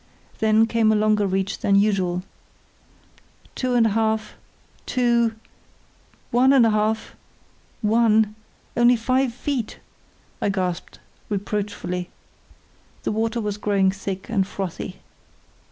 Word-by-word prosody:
Then 220 Hz, 0 st, +4 dB
came 225 Hz, -1 st, +2 dB
a -, -, +3 dB
longer 210 Hz, -1 st, +2 dB
reach 190 Hz, +1 st, -1 dB
than 200 Hz, -, +2 dB
usual. 190 Hz, -3 st, +2 dB, 1.3 s
"Two 255 Hz, -1 st, -1 dB
and 235 Hz, -2 st, +5 dB
a -, -, +3 dB
half—two—one 225 Hz, +2 st, -1 dB, 1.2 s
and 260 Hz, -4 st, +6 dB
a 225 Hz, -, +3 dB
half—one—only 220 Hz, +2 st, 0 dB
five 255 Hz, +2 st, +1 dB
feet," 245 Hz, -1 st, -3 dB, 0.6 s
I -, -, +1 dB
gasped, 185 Hz, -3 st, -3 dB, 0.3 s
reproachfully. 200 Hz, -3 st, -3 dB, 0.9 s
The -, -, -1 dB
water 225 Hz, +2 st, -1 dB
was 210 Hz, -2 st, -3 dB
growing 195 Hz, -2 st, +2 dB
thick 195 Hz, -1 st, -6 dB
and 195 Hz, -4 st, 0 dB
frothy. 190 Hz, -1 st, -6 dB
215 Hz, 100 wpm, -23 LUFS, 195-225 Hz, 1.3 s, and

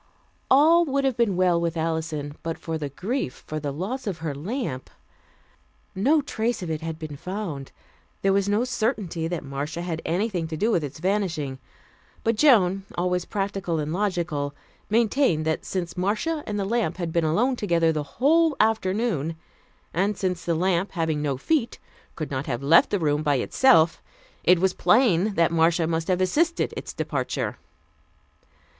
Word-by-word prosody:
All 320 Hz, +6 st, +6 dB
would 275 Hz, -2 st, 0 dB
have 265 Hz, -3 st, +1 dB
been 230 Hz, -5 st, +1 dB
well 180 Hz, -2 st, +3 dB
with 170 Hz, 0 st, -1 dB
Alison, 160 Hz, -2 st, -2 dB
but 165 Hz, 0 st, -4 dB
for 165 Hz, -, -4 dB
the 145 Hz, -2 st, -3 dB
grief 190 Hz, -, -4 dB
for 155 Hz, -, -4 dB
the 145 Hz, -1 st, -3 dB
loss 215 Hz, -, -4 dB
of 190 Hz, -5 st, -2 dB
her 160 Hz, -3 st, -4 dB
lamp. 155 Hz, -, -4 dB, 1.0 s
No 280 Hz, +10 st, +2 dB
trace 225 Hz, -4 st, -2 dB
of 165 Hz, -, -3 dB
it 155 Hz, 0 st, -3 dB
had 160 Hz, -1 st, -4 dB
been 155 Hz, -2 st, -7 dB
found. 175 Hz, -5 st, -5 dB, 0.5 s
There 195 Hz, 0 st, +3 dB
was 200 Hz, 0 st, +1 dB
no 210 Hz, +3 st, +2 dB
certainty 215 Hz, -9 st, -1 dB
that 170 Hz, -2 st, -3 dB
Marcia 145 Hz, +5 st, -4 dB
had 165 Hz, -2 st, -3 dB
had -, -, -8 dB
anything 180 Hz, 0 st, -1 dB
to 160 Hz, -1 st, -5 dB
do 220 Hz, +8 st, +1 dB
with 170 Hz, -, +1 dB
its 145 Hz, -1 st, -6 dB
vanishing, 165 Hz, -7 st, -1 dB, 0.6 s
but 230 Hz, 0 st, +2 dB
Joan, 200 Hz, -8 st, +4 dB
always 180 Hz, 0 st, 0 dB
practical 195 Hz, -4 st, -2 dB
and 155 Hz, 0 st, -2 dB
logical, 170 Hz, -7 st, -1 dB, 0.3 s
maintained 220 Hz, -, +2 dB
that 160 Hz, 0 st, -1 dB
since 175 Hz, -3 st, -3 dB
Marcia 215 Hz, -, -1 dB
and 210 Hz, -1 st, -2 dB
the 195 Hz, -, -1 dB
lamp 210 Hz, -6 st, 0 dB
had 170 Hz, -3 st, -3 dB
been 170 Hz, -, +2 dB
alone 220 Hz, +12 st, +2 dB
together 170 Hz, -7 st, +2 dB
the 155 Hz, -1 st, -1 dB, 0.2 s
whole 320 Hz, +3 st, +4 dB
afternoon, 205 Hz, -, +1 dB, 0.6 s
and 195 Hz, +3 st, 0 dB
since 180 Hz, -2 st, -2 dB
the 170 Hz, 0 st, 0 dB
lamp, 185 Hz, +2 st, 0 dB
having 160 Hz, -4 st, -1 dB
no 140 Hz, -3 st, -1 dB
feet, 245 Hz, -, 0 dB, 0.4 s
could 155 Hz, -3 st, -5 dB
not 135 Hz, +1 st, -3 dB
have 125 Hz, -1 st, -3 dB
left 160 Hz, +5 st, +6 dB
the 205 Hz, -, +1 dB
room 150 Hz, -4 st, +1 dB
by 145 Hz, -2 st, +2 dB
itself, 165 Hz, -, +4 dB, 0.4 s
it 180 Hz, +1 st, +5 dB
was 190 Hz, +2 st, +2 dB
plain 210 Hz, -4 st, +3 dB
that 165 Hz, 0 st, +3 dB
Marcia 165 Hz, 0 st, +3 dB
must 160 Hz, 0 st, -1 dB
have 185 Hz, 0 st, +1 dB
assisted 325 Hz, -, +1 dB
its -, -, -6 dB
departure. -, -, -3 dB
180 Hz, 175 wpm, -25 LUFS, 160-215 Hz, 1.0 s, All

